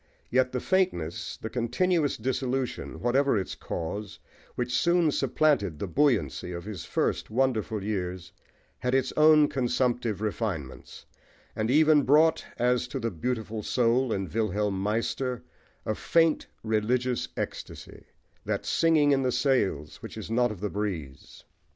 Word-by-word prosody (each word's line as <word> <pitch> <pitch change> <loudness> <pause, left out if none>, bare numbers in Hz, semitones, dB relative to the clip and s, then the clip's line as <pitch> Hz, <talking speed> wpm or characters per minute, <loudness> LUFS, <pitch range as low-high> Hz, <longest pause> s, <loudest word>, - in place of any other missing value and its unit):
Yet 130 +1 +3
the 125 - -2
faintness, 180 - -1
the 110 - -6
continuous 145 +6 +1
dissolution, 130 +1 -2
whatever 130 +1 +2
its 95 - -3
cause, 100 +5 -5 0.4
which 125 0 -2
soon 170 +1 +3
supplanted 135 - +1
the 100 - -3
buoyancy 100 - +1
of 85 0 -6
his 105 -6 -6
first - - -1
wonderful 110 -3 0
years, 90 -3 -3 0.5
had 125 +1 0
its 135 -1 +1
own 155 -1 +6
consumptive 120 -5 0
refinements, 105 - -4 0.5
and 110 +1 -1
even 150 +2 +5
brought, 155 +4 +4
as 125 0 +1
to - - -4
the 115 - -2
"Beautiful 110 +3 -3
Soul" 120 +3 +1
in 95 -2 -1
Wilhelm 105 -2 -1
Meister, 115 +4 -1 0.4
a 110 - 0
faint 165 +7 +2 0.2
religious 120 +3 0
ecstasy - - -6 0.4
that - - -2
"singing 160 -3 +3
in 135 -1 +3
the 130 -1 +1
sails" 125 - 0
which - - -9
is - - -7
not 120 0 +2
of 100 -4 -8
the 105 - -1
breeze. 85 -10 -5
120 Hz, 140 wpm, -27 LUFS, 105-135 Hz, 0.5 s, own